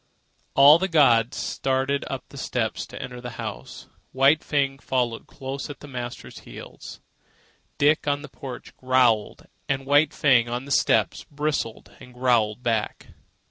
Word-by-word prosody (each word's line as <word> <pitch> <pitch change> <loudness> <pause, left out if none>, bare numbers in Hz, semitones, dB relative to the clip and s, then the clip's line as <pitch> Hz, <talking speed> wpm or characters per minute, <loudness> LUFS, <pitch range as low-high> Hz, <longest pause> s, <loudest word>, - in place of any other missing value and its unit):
All 145 +4 +8
the 190 - 0
gods 125 - +3
started 135 +1 -1
up 135 -2 -4
the 140 - -12
steps 115 -4 -2
to - - -10
enter 125 -1 -7
the 125 -2 -8
house. 110 -3 -7 0.3
White 135 +4 +4
Fang 135 -2 0
followed 125 -4 -2
closely 140 +1 -6
at 140 - -29
the 145 - -11
master's 120 -3 -7
heels. - - -11 0.8
Dick, 150 +1 +2
on 145 0 0
the - - -8
porch, 135 -4 -10
growled, 125 -4 +1 0.2
and 135 -1 -1
White 145 +2 +4
Fang, 125 -5 +3
on 120 +2 -4
the 140 - -9
steps, - - +2
bristled 145 -6 -4
and 125 0 -14
growled 120 -3 +1
back. 115 -3 -2
130 Hz, 150 wpm, -24 LUFS, 120-140 Hz, 0.8 s, All